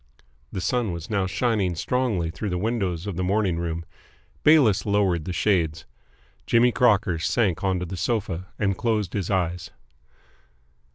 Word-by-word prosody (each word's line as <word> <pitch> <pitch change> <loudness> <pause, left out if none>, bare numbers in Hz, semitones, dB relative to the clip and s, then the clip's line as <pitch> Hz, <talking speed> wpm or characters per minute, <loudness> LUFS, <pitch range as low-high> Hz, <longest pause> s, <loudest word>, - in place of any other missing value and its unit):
The 95 - -4
sun 120 -3 0
was 85 +5 -7
now 100 -3 +1
shining 100 -2 0
strongly 105 -5 -1
through 105 +4 -4
the 90 - -1
windows 95 -4 -1
of 100 -5 -4
the 90 - -1
morning 95 -2 +1
room. 85 -1 -3 0.6
Bayliss 145 -10 +5
lowered 100 -6 +1
the 90 - -3
shades. 85 -7 0 0.6
Jimmy 120 +1 +4
Crocker 105 -8 +2
sank 95 0 0
onto 95 -2 0
the 90 +2 -6
sofa, 95 -2 -2
and 100 -2 0
closed 105 -4 -1
his 100 -4 -2
eyes. 90 -3 -1
95 Hz, 150 wpm, -24 LUFS, 85-110 Hz, 0.6 s, Bayliss